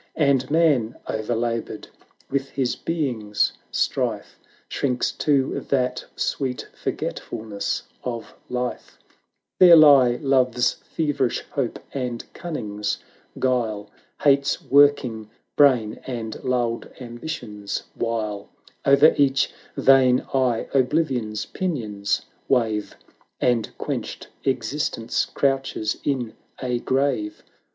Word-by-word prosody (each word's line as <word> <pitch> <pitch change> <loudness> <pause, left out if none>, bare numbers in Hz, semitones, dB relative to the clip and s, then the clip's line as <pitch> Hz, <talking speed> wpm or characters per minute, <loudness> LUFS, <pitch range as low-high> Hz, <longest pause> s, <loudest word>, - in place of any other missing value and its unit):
\nd 140 -4 +3
Man, 145 -8 +3
o'erlaboured 115 0 -2 0.4
with 135 0 -2
his 130 -3 -1
Being's 120 -11 -1 0.2
strife, - - -1 0.3
Shrinks 125 -3 0
to 140 -3 +1
that 125 -2 0
sweet 130 -3 -2
forgetfulness 110 -2 -4 0.2
of 120 -2 -5 0.2
life: 125 0 -4 0.6
There 180 -2 +10
lie 140 -6 +7
Love's 130 -2 +2
feverish 145 -6 -1
hope, 135 -5 -2 0.2
and 125 -3 -3
Cunning's 105 - -3 0.4
guile, 115 -5 -1 0.3
Hate's 140 0 +3
working 135 -6 +3 0.3
brain, 125 -7 +4
and 115 -4 -5
lulled 120 -2 -1
Ambi 120 +3 -8
tion's 105 -8 -4
wile: 110 -3 -3 0.3
O'er 140 +3 +6
each 140 -1 +2 0.2
vain 130 -2 +5
eye 130 -4 +1
ObUvion's 125 -6 +1
pinions 110 - -2 0.2
wave, 110 -5 0 0.4
.A.nd 120 -3 +1
quenched - - -4 0.2
Existence 120 -2 -1
crouches 135 -6 0
in 125 -6 -1 0.3
a 125 -2 -1
grave. 130 -5 -1
125 Hz, 95 wpm, -23 LUFS, 115-140 Hz, 0.6 s, There